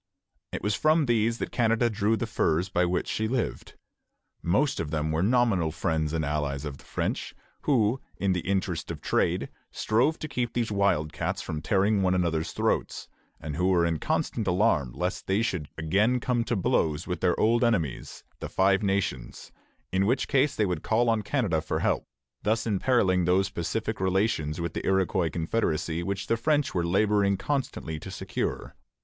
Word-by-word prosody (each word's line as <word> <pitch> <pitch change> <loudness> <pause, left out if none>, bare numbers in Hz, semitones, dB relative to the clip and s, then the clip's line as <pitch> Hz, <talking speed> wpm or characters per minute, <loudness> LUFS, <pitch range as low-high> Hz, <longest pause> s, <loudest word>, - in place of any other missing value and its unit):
It - - -5
was 105 - +1
from 155 +7 +3
these 115 -1 +1
that - - -4
Canada 115 0 +2
drew 110 0 +1
the 120 - -2
furs 90 -5 0
by 90 0 +2
which 90 +1 -1
she 110 - -1
lived. 125 +1 -3 0.7
Most 130 - +1
of 80 - -2
them 80 0 -1
were 80 +1 0
nominal 105 -6 +2
friends 80 -1 -1
and 80 -1 -1
allies 70 -1 -2
of 70 -2 -6
the - - -16
French, - - -3 0.3
who 125 -3 +2 0.2
in 100 -1 +1
the 90 - 0
interest 95 -1 -2
of - - -5
trade - - 0 0.2
strove 125 +9 +1
to 155 - -5
keep 120 -5 -2
these 115 -2 -1
wild 95 -7 +1
cats - - -2
from 75 -1 -4
tearing 100 +1 +2
one 95 -1 +2
another's 85 -3 0
throats, - - -1 0.3
and 75 -1 -5
who 90 +2 +2
were 90 -3 +3
in 80 -2 0
constant 110 -4 -1
alarm 90 - +2
lest - - -3
they 100 +4 +2
should 90 -10 -2
again 100 +10 +2
come 120 -1 0
to 120 - 0
blows 80 -4 +1
with 90 -3 -4
their 90 -1 +2
old 115 +3 +3
enemies, 90 - -1 0.2
the - - -5
Five 95 +1 +3
Nations, 95 - -2 0.4
in 95 +1 +2
which 125 +3 +1
case 140 +1 +2
they 105 - +2
would 90 -5 -2
call 115 +2 +2
on 110 -1 +1
Canada 105 - 0
for 80 - -2
help, - - 0 0.3
thus 110 +2 0
imperilling 100 -4 +2
those 95 +3 +2
pacific 105 +6 -3
relations 95 -5 0
with 85 -1 -3
the - - -4
Iroquois 95 -2 +1
confederacy 80 -1 -1
which 100 +2 -3
the 115 - +1
French 145 +3 +1
were 85 -2 0
laboring 100 +1 +2
constantly 130 - -3
to - - -8
secure. - - -4
95 Hz, 180 wpm, -27 LUFS, 85-115 Hz, 0.7 s, from